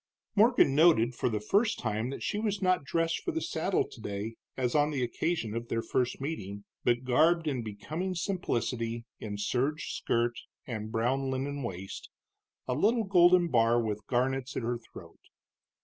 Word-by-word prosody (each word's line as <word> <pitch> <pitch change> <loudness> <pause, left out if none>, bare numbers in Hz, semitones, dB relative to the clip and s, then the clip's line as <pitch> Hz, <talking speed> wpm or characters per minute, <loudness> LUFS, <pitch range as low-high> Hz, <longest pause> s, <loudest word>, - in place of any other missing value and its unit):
Morgan 215 - +5
noted 145 -6 +5
for 125 - 0
the 110 -2 -1
first 210 - +2
time 110 +1 -2
that 135 - -6
she 210 - -1
was 210 -2 -1
not 185 -4 +2
dressed 165 +5 0
for 360 - -3
the 325 - -1
saddle 180 - 0
today 105 0 -5 0.2
as 125 -2 0
on 150 0 +3
the 140 -4 -1
occasion 120 -2 -1
of 115 0 -4
their 115 0 -1
first 125 -1 -1
meeting, 100 -9 -5 0.2
but 120 +1 +2
garbed 160 +6 +3
in 135 -5 0
becoming 155 - -4
simplicity 120 - -2
in 105 -2 -5
serge 135 +9 -1
skirt 120 0 0 0.3
and 110 -3 -5
brown 130 +4 0
linen 140 +2 -2
waist, 95 -5 -6 0.6
a 125 - 0
little 220 - +2
golden 180 -2 +5
bar 115 -2 +4
with 105 -2 -3
garnets 130 +1 0
at - - -2
her 120 +1 -1
throat. - - -14
130 Hz, 165 wpm, -30 LUFS, 115-165 Hz, 0.6 s, Morgan